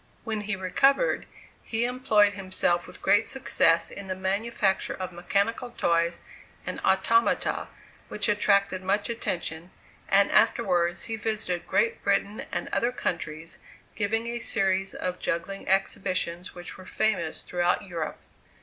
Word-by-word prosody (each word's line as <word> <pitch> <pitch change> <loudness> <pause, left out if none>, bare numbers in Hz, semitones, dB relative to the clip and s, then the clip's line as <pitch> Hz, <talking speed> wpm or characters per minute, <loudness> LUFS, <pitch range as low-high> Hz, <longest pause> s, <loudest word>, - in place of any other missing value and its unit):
When 220 -2 -3
he 210 0 -2
recovered, 270 - +2 0.3
he 225 +1 -1
employed 225 -5 +3
himself 185 -3 0
with - - -12
great - - +4
success - - +2
in 200 - -8
the 185 - -2
manufacture 195 +1 0
of 185 -1 -5
mechanical 205 +7 -1
toys 170 0 +1 0.4
and - - -4
automata 195 +5 +2 0.4
which 210 - 0
attracted 200 -2 +2
much 205 +4 +1
attention, 175 -6 -3 0.4
and 200 +1 +5
afterwards 175 -5 +2
he 225 -1 -4
visited 215 -5 -2
Great 460 0 +1
Britain 205 +2 0
and - - -2
other 240 - +1
countries, 165 -7 -4 0.3
giving 225 +2 -1
a 235 0 -3
series 195 -4 0
of 180 0 -3
juggling 170 +4 -3
exhibitions 185 -2 0
which 175 +1 -7
were 185 - -11
famous 180 -7 -1
throughout 175 +2 0
Europe. 170 -5 -4
195 Hz, 130 wpm, -27 LUFS, 180-220 Hz, 0.4 s, and